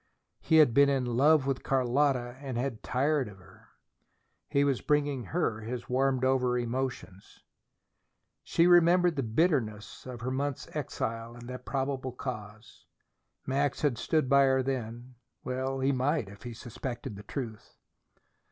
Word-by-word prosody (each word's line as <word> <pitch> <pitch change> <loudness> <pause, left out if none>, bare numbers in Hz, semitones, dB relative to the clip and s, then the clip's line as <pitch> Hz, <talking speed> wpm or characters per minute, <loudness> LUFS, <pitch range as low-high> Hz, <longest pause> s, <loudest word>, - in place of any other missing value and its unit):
He 160 - +1
had 150 -7 +6
been 140 +3 +6
in 135 -2 +1
love 135 +4 +4
with 135 -1 -1
Carlotta 130 -1 +1
and 135 -4 -5
had 125 -2 -3
tired 140 +2 +1
of 100 -2 -11
her. 90 - -19 0.8
He 140 - +3
was 140 -3 +1
bringing 145 -4 0
her 160 -10 -1
his 120 +2 -6
warmed 130 0 +1
over 125 -2 +2
emotions. 120 -5 -4 1.0
She 170 - +2
remembered 175 0 +5
the 140 - 0
bitterness 115 - -1
of 125 -2 -7
her 130 +2 -2
month's 140 +1 -2
exile, 115 -5 -4
and 120 +1 -9
its 125 -1 -7
probable 135 -1 -2
cause. 110 -4 -8 0.6
Max 140 +1 0
had 130 -6 +1
stood 155 -1 +1
by 140 +1 +5
her 130 0 +2
then. 125 -1 -5 0.3
Well 130 +1 -2
he 135 +1 +3
might, 135 -3 0
if 100 0 -13
he 120 - -7
suspected 120 -1 -6
the 100 - -9
truth. 110 0 -7
130 Hz, 150 wpm, -29 LUFS, 120-140 Hz, 1.0 s, had